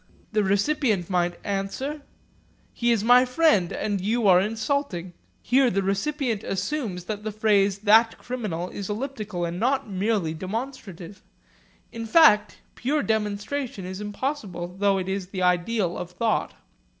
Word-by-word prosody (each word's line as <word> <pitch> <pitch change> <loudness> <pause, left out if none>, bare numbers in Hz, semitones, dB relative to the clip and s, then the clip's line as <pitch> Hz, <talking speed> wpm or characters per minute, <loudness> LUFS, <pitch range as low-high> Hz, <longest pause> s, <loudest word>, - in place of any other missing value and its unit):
The 215 -1 +2
recipient 200 - +1
might 175 -1 0
answer, 205 +9 -3 0.7
'He 240 0 +1
is 225 -3 +1
my 245 +2 +7
friend 250 - +2
and 205 -3 -2
you 220 +3 +1
are 180 -1 +6
insulting.' 215 - -2 0.3
Here 260 +1 +4
the 195 -1 0
recipient 225 +3 -1
assumes 195 - -3
that 210 +2 -5
the 215 - -3
phrase 205 -2 +2
'That 220 +2 +4
criminal' 205 -9 -4
is 200 -1 -6
elliptical 215 -6 -3
and 170 +1 -4
not 260 +4 +1
merely 195 -4 0
demonstrative. 195 - -6 0.7
In 230 0 -6
fact, 215 -8 +5 0.2
pure 285 +4 -1
demonstration 215 +1 -2
is 185 +2 -6
impossible 205 - -4
though 200 -1 +3
it 185 -1 -3
is 190 -1 -3
the 185 -1 -4
ideal 180 +1 +1
of 180 - -5
thought. 215 +5 -1
210 Hz, 140 wpm, -25 LUFS, 190-240 Hz, 0.7 s, my